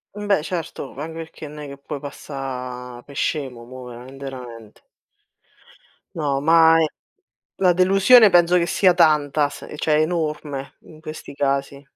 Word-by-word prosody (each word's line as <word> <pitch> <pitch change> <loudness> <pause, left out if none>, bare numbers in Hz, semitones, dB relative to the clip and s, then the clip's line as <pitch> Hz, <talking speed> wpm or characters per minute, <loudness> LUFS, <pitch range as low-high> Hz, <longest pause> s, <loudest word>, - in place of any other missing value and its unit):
Mh, 210 0 -6
beh, 200 -5 +2
certo, 165 -5 -5
anche 160 +3 -6
perché 160 -1 -8
n 150 +1 -11
è 150 -1 -7
che 140 - -9
puoi 140 +1 -7
passà 125 -3 -7
pe 145 - -13
scemo, 135 -4 -3
mo, 130 +1 -10
veramente, 125 +3 -11
verament 120 -5 -10 1.3
No, 140 -4 -1
ma 165 +1 +6
ehm, 160 - +3 0.7
la 185 -2 +4
delusione 195 +6 +6
penso 175 -1 +4
che 170 - +1
sia 185 +1 +4
tanta 150 -3 +3
s - - -11
ehm, - - -9
cioè 150 0 +2
enorme, 150 -4 -3
in 155 -1 -16
questi 155 -1 -9
casi. 140 0 -1
150 Hz, 155 wpm, -22 LUFS, 135-165 Hz, 1.3 s, ma